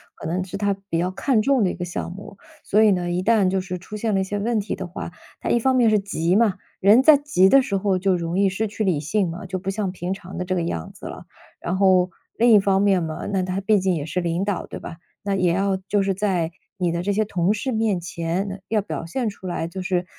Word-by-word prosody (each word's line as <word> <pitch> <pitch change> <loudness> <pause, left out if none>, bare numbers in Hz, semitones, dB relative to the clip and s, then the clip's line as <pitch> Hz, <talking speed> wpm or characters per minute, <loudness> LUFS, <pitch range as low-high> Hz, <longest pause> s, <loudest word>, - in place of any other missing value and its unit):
可 - - -7
能 180 +3 -1
是 190 +1 -6
他 200 -1 0
比 165 - 0
较 180 +2 0
看 215 +5 +1
重 265 0 +3
的 185 - +2
一 - - -5
个 175 - -4
项 175 -1 -4
目。 200 +2 -10 0.3
所 215 +2 +3
以 215 - +6
呢， 180 -2 0
一 180 +1 -1
旦 215 -3 +3
就 190 0 0
是 185 -1 -5
出 180 +4 -10
现 215 0 -1
了 195 - +2
一 - - +1
些 205 +2 -3
问 225 +1 0
题 205 - -3
的 185 - -6
话， 190 0 -7 0.3
他 - - -4
一 - - +3
方 260 +2 +2
面 240 -3 +5
是 215 -1 +3
急 180 -3 0
嘛， 215 -3 +3 0.3
人 210 +6 +7
在 300 +2 +8
急 275 -10 +3
的 275 +7 +6
时 200 -6 -1
候 190 -1 +1
就 185 0 +2
容 170 +1 -3
易 200 0 +4
失 210 +4 -2
去 215 +1 -3
理 180 -7 +1
性 185 +5 0
嘛， 170 +4 -7
就 190 0 -3
不 190 +1 -4
像 195 -1 -2
平 180 +1 -3
常 190 -1 -9
的 - - -2
这 185 0 -1
个 175 - 0
样 85 - -4
子 - - -13
了。 - - -8 0.4
然 180 - -2
后， 185 -2 +4 0.3
另 235 +1 +5
一 210 - +8
方 195 0 +2
面 195 -3 +3
嘛， 160 +1 -5
那 195 - +1
他 185 +1 -2
毕 210 +1 +3
竟 185 -1 +1
也 145 -3 -3
是 165 +3 -2
领 175 +1 -1
导， 200 -3 -2
对 - - -7
吧？ 165 - -8 0.3
那 200 -1 0
也 180 -3 +2
要 195 +1 +1
就 195 +2 0
是 195 0 +1
在 185 -4 0 0.3
你 180 -3 0
的 170 0 -2
这 200 +3 0
些 215 +2 +2
同 190 -2 0
事 240 +5 -3
面 220 -5 0
前， 175 +4 -3
要 215 -2 +1
表 180 - -5
现 230 +7 -2
出 195 -2 -9
来 170 -2 -3
就 190 +2 -6
是， 185 -1 -1
190 Hz, 295 characters per minute, -23 LUFS, 180-205 Hz, 0.4 s, 在